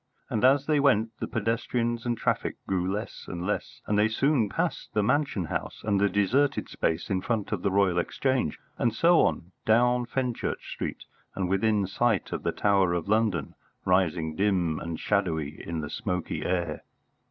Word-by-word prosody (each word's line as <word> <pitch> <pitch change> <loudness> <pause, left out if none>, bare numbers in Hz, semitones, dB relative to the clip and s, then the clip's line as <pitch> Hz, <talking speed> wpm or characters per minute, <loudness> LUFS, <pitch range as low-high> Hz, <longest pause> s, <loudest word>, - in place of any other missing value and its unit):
And, 110 - 0
as 135 +2 +5
they 150 -1 +2
went, 115 -6 +3
the - - -3
pedestrians 115 +2 -1
and 120 -1 0
traffic - - -1
grew 95 -1 0
less 105 +3 -5
and 90 0 -5
less, 105 - -3
and 105 0 +1
they 105 - +5
soon 115 0 +2
passed - - -3
the 105 - +3
Mansion 125 - +1
House - - -4
and 100 -2 +1
the 100 - +4
deserted 130 +9 +1
space 80 +5 -1
in 95 -1 +1
front 110 -2 -2
of 105 -4 -1
the 100 - +1
Royal 95 -2 +3
Exchange, 130 - 0 0.2
and 115 -2 +1
so 170 +4 +5
on 85 +2 0
down 120 +2 +3
Fenchurch 125 -1 -3
Street - - -5 0.3
and 95 -2 -1
within 100 +2 +2
sight 110 +2 0
of - - -3
the - - 0
Tower 100 -3 +2
of 85 0 -2
London, 105 -8 +1 0.3
rising 85 -4 +1
dim 90 -5 +1
and 85 -1 -5
shadowy 80 -7 -1
in 85 -1 -3
the 75 - -5
smoky 90 -2 -3
air. 85 -4 -1
105 Hz, 175 wpm, -27 LUFS, 90-120 Hz, 0.3 s, as